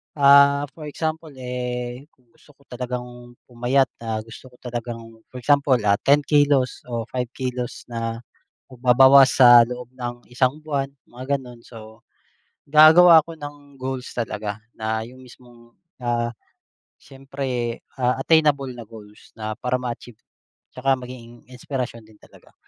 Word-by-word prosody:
ah, 140 0 +6
for 155 -2 -10
example, 160 +2 -4
eh, 125 +1 -5
kung 125 -3 -34
gusto 145 - -23
ko 140 - -26
talagang 125 -1 -7
pumayat, 125 +2 0
ah, 110 -2 -4
gusto 115 +3 -13
ko 125 - -19
talagang 115 -2 -7
for 130 - -11
example, 140 0 +3
ah, 100 0 +2
10 145 +3 +3
kilos 145 -3 +2
o 115 -2 -3
5 125 -1 -2
kilos 125 -2 -5
na 115 0 -4 0.5
magbabawas 130 +2 +5
sa 120 -2 +8
loob 125 0 -8
ng 120 -1 -6
isang 130 +4 0
buwan, 140 -3 -2 0.2
mga 130 +3 -3
gano'n, 125 -2 -13
so 110 -1 -14 0.7
gagawa 160 +2 +8
ako 165 +2 -11
ng 145 -1 -11
goals 130 0 -5
talaga 105 -3 -4 0.2
na 110 0 -3
'yung 130 +2 -14
mismong, 120 -2 -18 0.3
ah, 120 -1 -1 0.7
siyempre, 135 -3 -5 0.2
ah, 125 0 0
attainable 150 -3 +2
na 120 - -9
goals 105 -1 -15
na 110 -1 -6
para 125 0 -1
ma-achieve. 120 -2 -7 0.5
'Tsaka 135 +1 +1
maging 120 -2 -12
inspirasyon 125 -3 -6
din 110 -1 -21
talaga. - - -20
125 Hz, 140 wpm, -22 LUFS, 120-135 Hz, 0.7 s, sa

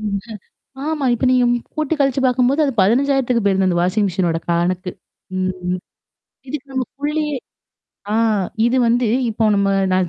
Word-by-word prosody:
ம் 205 -2 -2 0.7
ஆமா. 310 -3 -1
இப்ப 240 +2 -1
நீங்க 250 -1 +4 0.3
கூட்டி 310 0 -1
கழிச்சு 270 -1 +2
பார்க்கும்போது, 255 +3 +2
அது 275 - -1
15000த்துக்கு 250 +2 +2
போயிருது 195 -1 +2
அந்த 175 -2 +1
வாஷிங் 200 +4 +1
மெஷினோட 175 -3 0
கடனுக்கு 175 +2 0 0.5
ம். 185 -1 -2 0.7
இதுக்கு 285 +1 -6
நம்ம 260 -1 -1
குள்ளயே 300 0 -1 0.8
ஆ - - +1 0.5
இது 240 +2 +2
வந்து 240 +1 +2 0.2
இப்போ 220 0 -1
நம்ம 200 0 +2 0.2
நான் 185 -1 +2
235 Hz, 145 wpm, -19 LUFS, 185-270 Hz, 0.8 s, நீங்க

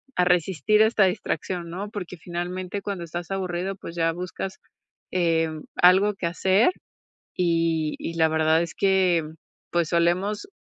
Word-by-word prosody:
a 180 - +3
resistir 180 +3 +3
esta 220 -2 +4
distracción, 180 -1 -2
¿no? 200 +4 -5
Porque 185 -5 -7
finalmente, 180 +3 -5
cuando 195 -4 -4
estás 175 +2 -6
aburrido, 190 0 -2
pues, 170 -3 -9
ya 165 -1 +1
buscas, 180 +2 -6 0.5
em, 165 -3 0
algo 190 +4 +5
qué 175 -3 -3
hacer. 190 - +3 0.6
Y 165 -3 +1
y 165 - -5
la 160 -1 +3
verdad, 160 +1 +3
es 170 - -5
que, 190 -3 +3
mm, 155 - -11 0.4
pues, 170 -2 +1
solemos, 180 - 0
175 Hz, 145 wpm, -25 LUFS, 165-190 Hz, 0.6 s, algo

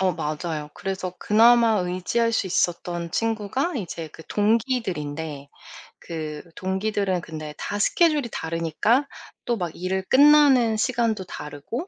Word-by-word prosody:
어 190 -1 +2
맞아요. 155 0 -4
그래서 185 -1 -4
그나마 230 +1 +5
의지할 185 +6 0
수 215 - 0
있었던 175 -1 -1
친구가 225 - -1
이제 170 -6 -5
그 160 - -13
동기들인데 175 - -1 0.5
그 155 -3 -6
동기들은 190 -1 -1
근데 155 -2 -7
다 205 - -4
스케줄이 300 +2 +2
다르니까 165 - 0 0.4
또 240 -1 0
막 175 -4 -3
일을 190 +2 -2
끝나는 275 -5 +6
시간도 230 -3 0
다르고 150 - -6
190 Hz, 290 characters per minute, -24 LUFS, 165-230 Hz, 0.5 s, 끝나는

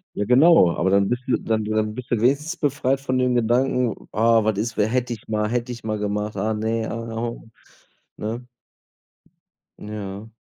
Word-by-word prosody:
Ja, 105 - -1
genau. 125 - +6
Aber 95 +2 +1
dann 100 0 +3
bist 125 +1 -1
du 125 - +3
dann 110 -1 -1
dann 110 0 -1
bist 130 +1 -8
du 115 -3 +1
wenigstens 145 +8 +1
befreit 135 -3 0
von 130 -1 -1
dem 125 -1 +2
Gedanken: 120 +1 +1
„Ah, 115 +1 +4
was 110 -2 0
ist, 110 +1 -2
we 105 - +3
hätte 125 0 -1
ich 110 - -8
mal 105 -1 0
hätte 120 +2 -2
ich 120 -2 -7
mal 110 -1 -2
gemacht, 105 +1 -2
ah, 110 - 0
ne, 110 +1 -1
ah, 115 0 -5
ho“, 115 0 -5 0.7
ne? 115 +3 -5 1.3
Ja. 105 0 -7
115 Hz, 185 wpm, -23 LUFS, 105-125 Hz, 1.3 s, genau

